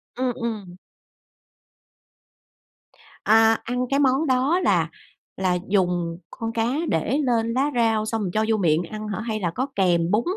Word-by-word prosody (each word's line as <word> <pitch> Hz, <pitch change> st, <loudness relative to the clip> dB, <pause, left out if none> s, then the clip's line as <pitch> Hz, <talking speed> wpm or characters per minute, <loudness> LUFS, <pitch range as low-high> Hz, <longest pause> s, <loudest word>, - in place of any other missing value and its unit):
Ừm, 250 Hz, 0 st, -1 dB
ừm. 215 Hz, -7 st, -5 dB, 2.5 s
À, 225 Hz, +1 st, +5 dB
ăn 250 Hz, +1 st, -2 dB
cái 275 Hz, +1 st, +1 dB
món 275 Hz, +3 st, +2 dB
đó 265 Hz, +7 st, +2 dB
là -, -, +2 dB, 0.5 s
là 185 Hz, -2 st, +1 dB
dùng 175 Hz, -4 st, 0 dB
con 225 Hz, 0 st, -5 dB
cá 225 Hz, -1 st, 0 dB, 0.2 s
để 215 Hz, -, 0 dB
lên 230 Hz, -5 st, 0 dB
lá 275 Hz, +4 st, +1 dB
rau 225 Hz, -2 st, +2 dB
xong 225 Hz, 0 st, -2 dB
rồi 185 Hz, -4 st, -2 dB
cho 215 Hz, 0 st, +1 dB
vô 220 Hz, -1 st, +2 dB
miệng 165 Hz, -4 st, +2 dB
ăn 215 Hz, +5 st, -7 dB
hả? 205 Hz, -, -4 dB
Hay 220 Hz, -1 st, -3 dB
là 175 Hz, -4 st, -1 dB
có 260 Hz, +3 st, -1 dB
kèm 175 Hz, -2 st, +2 dB
bún 215 Hz, +3 st, +2 dB
225 Hz, 160 wpm, -23 LUFS, 190-250 Hz, 2.5 s, À